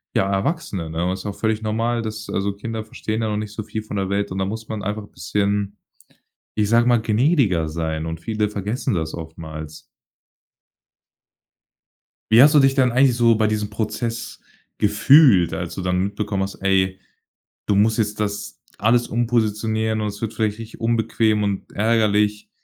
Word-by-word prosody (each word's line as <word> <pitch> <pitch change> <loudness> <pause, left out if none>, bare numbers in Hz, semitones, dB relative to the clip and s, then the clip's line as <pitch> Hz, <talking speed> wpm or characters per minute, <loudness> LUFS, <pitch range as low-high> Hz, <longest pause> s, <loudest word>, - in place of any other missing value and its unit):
ja, 95 +1 +2
Erwachsene, 100 - -2
ne? 80 +2 -2
Und 90 - 0
das 95 - -4
ist - - -14
auch 100 -1 -4
völlig 110 -1 0
normal, 115 +2 -1
dass 110 -1 -6
also 100 +1 -1
Kinder 110 +2 -5
verstehen 110 0 -4
ja 110 - 0
noch 105 - -1
nicht 105 0 -6
viel 110 0 -5
von 105 -1 -6
der 95 -1 -1
Welt 100 0 -1
und 95 - -4
da 95 - 0
muss 110 +3 -6
man 110 -2 -4
einfach 105 +2 -3
'n 100 - -16
bisschen, 100 +3 -1 0.8
ich 105 -1 +1
sage 115 +1 +4
mal, 120 -2 +4
gnädiger 110 - +2
sein 80 0 -3
und 80 0 -5
viele 110 +1 -1
vergessen 105 +5 -2
das 80 -3 -2
oftmals. 80 -2 -8 2.5
Wie 115 +4 +8
hast 150 - +6
du - - +8
dich 135 -1 +4
dann 130 -2 +3
eigentlich 130 0 +4
so 120 -1 +4
bei 110 0 +2
diesem 105 -1 -1
Prozess 110 +2 -4 0.4
gefühlt, 130 - +5
als 85 -2 -4
du 95 - -4
dann 90 0 0
mitbekommen 100 0 -2
hast: 95 - -5
Ey, 95 -1 +1 0.7
du 100 - +2
musst 110 +2 +3
jetzt 105 -1 -1
das 100 - -3 0.2
alles 120 +3 +2
umpositionieren 110 -1 0
und 105 - -1
es 105 0 -9
wird 115 -1 -3
vielleicht 110 -1 -1
richtig 115 0 -10
unbequem 110 -2 +1
und 100 -1 -3
ärgerlich. 105 -1 +1
105 Hz, 180 wpm, -21 LUFS, 100-115 Hz, 2.5 s, Wie